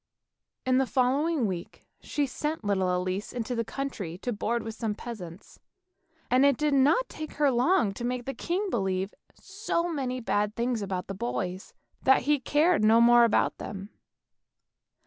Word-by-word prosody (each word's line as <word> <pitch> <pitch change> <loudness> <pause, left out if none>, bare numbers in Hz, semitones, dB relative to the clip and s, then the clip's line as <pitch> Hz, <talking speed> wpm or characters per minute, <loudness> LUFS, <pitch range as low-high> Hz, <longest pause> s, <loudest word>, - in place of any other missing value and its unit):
In 255 0 +3
the 265 - +1
following 270 +3 +1
week 180 -4 -5
she 290 - -1
sent 300 +2 -3
little 190 -3 +1
Elise 185 +3 -3
into 245 0 -3
the 230 -1 -1
country 225 -9 -5
to 245 - -1
board 230 +3 -1
with 225 - -5
some 220 -2 -3
peasants, 190 -7 -9 0.7
and 255 +2 +5
it 280 -3 +4
did 300 -1 +1
not 290 - +4
take 310 -1 -8
her 290 -2 +2
long 250 - +2
to 235 - -7
make 245 0 -2
the 270 - -3
king 365 - -2
believe 190 -1 -1 0.2
so 380 -3 -2
many 255 -4 -2
bad 210 -3 0
things 235 -1 -1
about 190 -2 -3
the 195 - -6
boys, 180 +5 -4 0.3
that 265 0 +4
he 295 +2 +2
cared 300 +1 +2
no 220 +2 +6
more 240 0 +7
about 230 - +1
them. 195 0 -7
240 Hz, 165 wpm, -28 LUFS, 205-280 Hz, 0.7 s, more